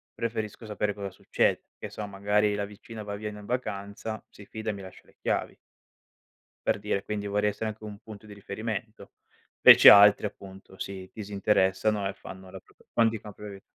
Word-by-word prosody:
preferisco 110 -1 -4
sapere 105 -1 -2
cosa 100 -2 -5
succede: - - 0
che - - -7
so, 105 - -5
magari 105 +1 +1
la 100 0 -2
vicina 105 +2 -10
va 100 0 -5
via 105 +1 -5
n 105 - -10
in 105 - -11
vacanza, 105 -2 -4
si 100 - -14
fida 110 0 -4
e - - -5
mi 100 - -8
lascia 95 -1 -12
le - - -24
chiavi - - -1 1.1
per - - +2
dire, 100 -1 -2
quindi 105 -1 -4
vorrei 105 +1 +1
essere 110 +2 -4
anche 110 0 -9
un 105 -1 -8
punto 110 -1 -12
di 105 - -11
riferimento. 110 +2 -6 0.5
Invece - - +11
altri, 105 +1 +8
appunto, 95 -1 -9
si 95 -1 -6
disinteressano 100 0 +1
e 100 - -4
fanno 95 -1 -11
la 95 - -8
propr - - -26
quan 115 -1 +4
ti 110 -1 -5
copro 105 0 -10
io. 100 0 -11
105 Hz, 190 wpm, -28 LUFS, 100-105 Hz, 1.1 s, Invece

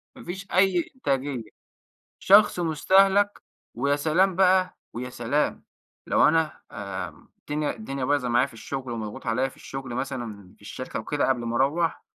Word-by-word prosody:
ما - - -12
فيش 190 +3 -7
أي 185 -2 +2
إنتاجية، 135 - -1 0.8
شخص 200 -2 +5
مُستَهلَك. 195 +5 +3 0.3
ويا 140 +4 +1
سلام 170 +5 +2
بقى، 185 -1 +3
ويا 125 +1 -5
سلام 125 +5 -1 0.4
لو - - +4
أنا، 160 -1 +1
آآ 95 -2 -5 0.3
الدنيا 150 0 -2
الدنيا 135 -12 -4
بايظة 140 -2 +1
معايا 120 +3 +3
في - - -16
الشغل 130 +2 -5
ومضغوط 110 -2 -6
عليَّ 125 +4 +1
في - - -19
الشغل 135 -2 -7
مثلًا 120 -7 -5
في - - -25
الشركة 105 +5 -6
وكده 145 +5 -1
قبل 125 -2 +1
ما 115 0 -2
أروَّح 155 +6 +1
140 Hz, 155 wpm, -25 LUFS, 120-175 Hz, 0.8 s, شخص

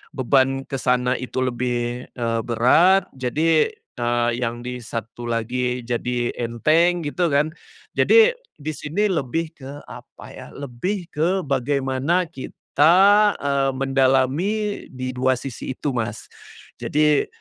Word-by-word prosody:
beban 135 0 +2
ke 135 -1 -5
sana 125 0 +1
itu 130 0 -3
lebih, 120 0 -2
eee, 115 -2 -1
berat 165 +12 +4
jadi, 155 +5 +2 0.3
eee, 120 0 +1
yang 120 0 -3
di 125 0 -5
satu 115 +1 -7
lagi 125 +2 -2
jadi 120 0 -2
enteng 155 +9 +2
gitu 170 +4 0
kan. 150 +1 +1 0.5
Jadi 455 +1 +6 0.2
di 155 +2 -5
sini 165 +8 -1
lebih 160 +1 -2
ke 135 +1 -8 0.2
apa - - -12
ya, - - -10
lebih 160 +8 -4
ke 180 +5 0
bagaimana 140 +4 0
kita, 150 +3 +1 0.4
eee, 140 -1 0
mendalami 135 +10 +1
di 130 0 -5
dua 130 +1 +1
sisi 130 0 -6
itu 145 - -2
Mas. 115 -4 -4 0.5
Jadi 150 0 +2
130 Hz, 125 wpm, -22 LUFS, 125-155 Hz, 0.5 s, Jadi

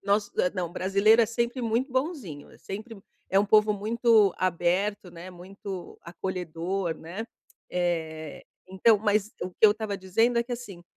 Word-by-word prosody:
nosso 205 +1 +1
eh, 180 - +2
não, 175 -2 -3
brasileiro 200 +5 +4
é - - +2
sempre 235 +2 -2
muito 235 +4 -1
bonzinho. 260 - -3
Sempre 215 +3 -8 0.3
é 195 - +4
um 205 - +2
povo 210 0 +5
muito 220 -1 +3
aberto, 185 +2 0
né, 175 +2 -10
muito 185 +1 -9
acolhedor, 175 0 -3
né? 185 +8 -7 0.5
Eh, 160 -3 -3 0.3
então, 205 +3 +4
mas 210 0 +1
o 180 - -3
que - - -29
eu 210 -1 +8
tava 215 -2 -4
dizendo 225 +6 +1
é 235 - +3
que, 245 - -7
assim, 210 -8 -7
200 Hz, 160 wpm, -27 LUFS, 180-225 Hz, 0.5 s, eu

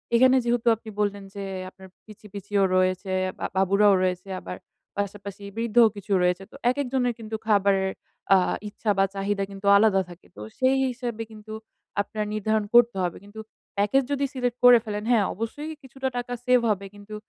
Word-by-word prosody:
এখানে 255 +2 +6
যেহেতু 240 0 0
আপনি 220 0 -12
বললেন 205 -1 -1
যে 200 - -5 0.3
আপনার 190 0 -15 0.2
পিচ্চি 215 -1 -14
পিচ্চিও 200 0 -1
রয়েছে 185 +1 +1 0.3
বা - - -3
বাবুরাও 200 +2 +4
রয়েছে 185 +1 -2
আবার 90 0 -7 0.4
পাশাপাশি 200 0 -5
বৃদ্ধও 235 0 +4
কিছু 205 0 -9
রয়েছে। 180 +1 +1
তো - - -14 0.2
একেক 285 +2 -2
জনের 245 -2 +1
কিন্তু 220 0 -5
খাবারের 195 -2 +2 0.4
আ - - +7 0.3
ইচ্ছা 210 +1 -2
বা 195 - +4
চাহিদা 195 0 -1
কিন্তু 195 0 -9
আলাদা 200 -2 +4
থাকে। 175 +1 -14
তো - - -8 0.2
সেই 260 +1 +3
হিসাবে 240 -2 -4
কিন্তু 215 0 -10 0.5
আপনার 210 +1 -4
নির্ধারণ 215 0 0
করতে 240 -3 +6
হবে। 175 -2 -2
কিন্তু 205 +2 -12 0.4
প্যাকেজ 210 +7 +3
যদি 280 0 +1
সিলেক্ট 250 -2 -2
করে 245 -1 +9
ফেলেন, 210 -1 -4
হ্যাঁ 220 -4 +4
অবশ্যই 290 +9 -5
কিছুটা 265 0 -5
টাকা 245 0 -4
সেভ 250 -1 +5
হবে 200 -2 -1
কিন্তু 205 +1 -10
210 Hz, 175 wpm, -25 LUFS, 195-240 Hz, 0.5 s, করে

